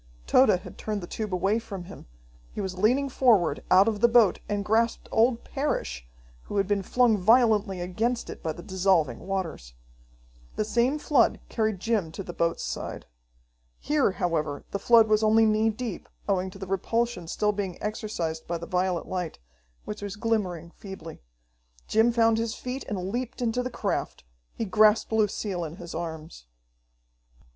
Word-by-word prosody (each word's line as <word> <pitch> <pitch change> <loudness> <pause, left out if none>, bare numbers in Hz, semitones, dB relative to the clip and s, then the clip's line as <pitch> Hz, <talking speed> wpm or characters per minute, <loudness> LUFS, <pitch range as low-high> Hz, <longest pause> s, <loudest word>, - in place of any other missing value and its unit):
Tode 210 -8 +4
had - - -12
turned 210 -2 -3
the - - -6
tube 215 +3 -5
away 195 +5 +1
from 195 -5 -7
him. 180 - -12 0.4
He - - -7
was 190 -2 -3
leaning 245 +9 +2
forward 220 - +3
out 190 +3 +6
of 215 -2 0
the 235 - +7
boat 230 -5 +4
and 205 -1 -1
grasped 230 +2 +1
old 235 +1 +2
Parrish, 65 - -3 0.4
who 205 - -4
had 195 -1 +2
been 205 -1 +1
flung 230 +1 +2
violently 215 -2 +3
against 225 +7 -1
it - - -8
by 160 - -2
the 175 +2 -9
dissolving 180 -10 +1
waters. 165 - -4 0.8
The 215 - 0
same 240 +6 +1
flood 290 -5 +2
carried 220 -4 -1
Jim 205 -6 0
to 195 - -5
the 175 - -7
boat's 170 0 -1
side. - - -5 0.7
Here, 290 -9 +1
however, 155 -5 -2
the 200 - -2
flood 225 +1 +6
was 215 0 +3
only 220 +1 +5
knee 215 +1 +3
deep, 220 -2 -5 0.2
owing 190 -2 0
to 185 - -12
the 190 - -6
repulsion 195 0 -1
still 210 +5 +1
being 200 -3 -4
exercised 210 -7 -4
by 170 - -2
the 170 - -7
violet 180 -1 -1
light, 180 -3 -4 0.5
which 210 0 -6
was 205 -1 -5
glimmering 195 -7 -2
feebly. 190 -5 -10 0.7
Jim 225 +2 +4
found 225 -1 +3
his 230 0 -2
feet 255 +1 -5
and 185 -2 -3
leaped 245 +2 -4
into 245 0 0
the 250 - -3
craft. - - -3 0.3
He 225 - -2
grasped 215 +2 +4
Lucille 210 -4 0
in 160 0 -6
his 175 -1 -9
arms. 160 - -7
205 Hz, 170 wpm, -27 LUFS, 180-225 Hz, 0.8 s, the